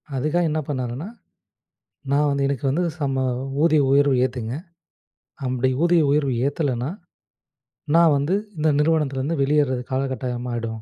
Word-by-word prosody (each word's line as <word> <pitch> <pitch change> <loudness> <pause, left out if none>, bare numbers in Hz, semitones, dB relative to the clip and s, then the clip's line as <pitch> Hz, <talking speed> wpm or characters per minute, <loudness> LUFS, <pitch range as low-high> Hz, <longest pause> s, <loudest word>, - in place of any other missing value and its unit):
அதுக்காக 155 +6 +1
என்ன 155 - -1
பண்ணாருன்னா, 130 +3 -4 1.1
"நான் 150 +1 +3
வந்து 140 0 0
எனக்கு 140 -1 -3
வந்து 160 +7 0 0.2
சம 135 -2 -1 0.4
ஊதிய 155 -3 +4
உயர்வு 140 -1 +4
ஏத்துங்க, 120 -2 -5 0.9
அப்டி 130 0 0
ஊதிய 170 -1 +4
உயர்வு 145 -2 +1
ஏத்தலன்னா, 140 -3 -1 1.1
நான் 165 -2 +6
வந்து 150 +8 0 0.2
இந்த 155 +1 +2
நிறுவனத்திலருந்து 150 -1 0
வெளியேர்ற 145 -2 +2 0.2
காலகட்டாயமாயிடும். 125 -4 -3
140 Hz, 115 wpm, -22 LUFS, 130-150 Hz, 1.1 s, நான்